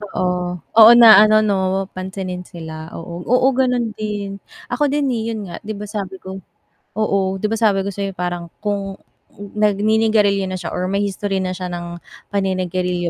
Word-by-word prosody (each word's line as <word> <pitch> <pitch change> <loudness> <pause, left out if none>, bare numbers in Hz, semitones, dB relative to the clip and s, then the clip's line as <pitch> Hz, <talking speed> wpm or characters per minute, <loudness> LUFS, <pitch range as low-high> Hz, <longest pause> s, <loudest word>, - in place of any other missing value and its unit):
Oo. 180 -3 -3 0.2
Oo, 225 0 +11
na 230 - +10 0.2
ano, 215 0 +4
'no 200 - +2 0.4
pansinin 185 -1 -5
sila, 160 -3 -8 0.2
oo. 170 +1 -8 0.2
Oo, 250 +1 +4
gano'n 250 -2 +1
din. 210 -2 -4 0.4
Ako 245 +5 +1
din, 290 -1 +1
eh, - - -2
'yun 220 - -5
nga, - - -6
di 215 - -4
ba, 210 - -6
sabi 195 -2 -4
ko 190 - -8 0.7
oo, 210 -2 +1 0.2
'di 215 - +1
ba 225 - 0
sabi 200 -2 +3
ko - - -2
sa'yo 195 0 -4
parang 175 -1 -4 0.2
kung 205 -1 -1 0.5
nagninigarilyo 210 0 +1
na 185 - -5
siya - - -5
or 180 - -2
may 200 +2 -1
history 200 -1 -2
na 185 - -2
siya 185 - -5
ng 175 0 -6 0.3
paninigarilyo 185 -2 -1
195 Hz, 175 wpm, -19 LUFS, 180-210 Hz, 0.7 s, Oo